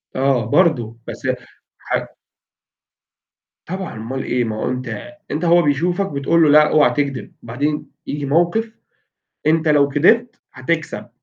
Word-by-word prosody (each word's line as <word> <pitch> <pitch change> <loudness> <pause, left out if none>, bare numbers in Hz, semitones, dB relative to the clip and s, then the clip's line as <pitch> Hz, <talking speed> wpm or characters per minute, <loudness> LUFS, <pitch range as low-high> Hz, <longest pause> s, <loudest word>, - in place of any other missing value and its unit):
آه، 130 -3 +1
برضه، 135 -11 +2
بس - - -7 0.6
ح - - -6 1.7
طبعًا 185 -7 -5
أومال 125 +5 -4
إيه؟ 125 0 0
ما 110 -2 -3
هو 110 - -2
أنت 125 - -5 0.2
أنت 155 +4 -2
هو 170 +1 +5
بيشوفك 175 +6 0
بتقول 145 +4 +2
له: 155 - +5
"لأ، 150 +1 +6
أوعي 150 -1 +4
تكدب." 140 -3 -2
بعدين 145 +6 -2 0.2
ييجي 145 0 -3
موقِف، 175 +10 +1 0.7
أنت 160 +1 +2
لو 145 -2 +4
كدبت 200 - +2
هتكسب 155 +5 -3
150 Hz, 135 wpm, -19 LUFS, 130-170 Hz, 1.7 s, لأ